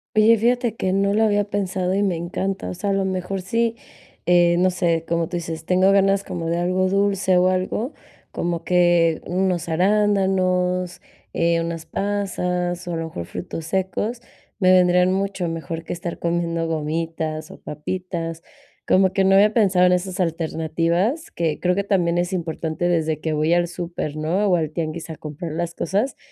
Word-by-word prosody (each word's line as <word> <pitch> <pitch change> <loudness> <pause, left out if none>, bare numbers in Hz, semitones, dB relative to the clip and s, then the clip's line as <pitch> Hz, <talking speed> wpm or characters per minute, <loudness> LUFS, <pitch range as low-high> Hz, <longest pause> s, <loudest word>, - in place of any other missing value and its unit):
Oye, 220 +1 +6
fíjate 240 0 +1
que 185 -4 -1
no 200 +1 +2
lo 220 - +3
había 205 -1 +2
pensado 190 -2 -1
y 200 - +2
me 190 -3 +1
encanta, 185 +3 -3
o - - -5
sea, 200 +2 -2
a - - +2
lo 195 0 +1
mejor 190 0 -2
sí, 230 +5 0 0.5
eh, 175 -1 +5
no 185 +1 +4
sé, 170 -2 0
como 170 -1 0
tú 175 -1 -3
dices, 165 -1 -5
tengo 185 +2 +4
ganas 195 0 +3
como 170 -3 -5
de 165 +1 0
algo 185 +2 +1
dulce 195 -1 +2
o 180 - +4
algo, 185 +8 -1 0.4
como 170 -1 -2
que 175 -2 +3
unos 180 -1 0
arándanos, 185 -1 +1 0.3
eh, 170 0 +2
unas 165 -1 -5
pasas 180 -3 -2
o 175 - -3
a - - -1
lo 165 - -3
mejor 85 - -6
frutos 165 - -6
secos, 190 +7 -2 0.4
me 185 -2 +5
vendrían 180 0 +5
mucho 195 -2 -1
mejor 165 0 -5
que - - -5
estar 170 0 -5
comiendo 170 -1 -1
gomitas 160 0 -3
o - - -12
papitas. 165 +1 -5 0.4
Como 190 0 +3
que 195 - +2
no 190 0 +4
había 205 +2 +6
pensado 195 -5 +4
en 180 - +4
esas 185 +1 -2
alternativas, 170 - -1
que 160 -3 -1
creo 180 0 +2
que 200 +2 -1
también 175 -4 +1
es 175 +2 -1
importante 165 -1 -2
desde 160 -3 0
que 155 0 -2
voy 155 +2 +2
al 175 0 +2
súper, 170 -3 -5
¿no?, 165 +7 0
o 185 - +4
al 160 -2 -1
tianguis 160 0 -4
a 160 - -5
comprar 155 +2 -7
las 170 +1 -3
cosas, 205 - -1
180 Hz, 180 wpm, -22 LUFS, 165-195 Hz, 0.5 s, Oye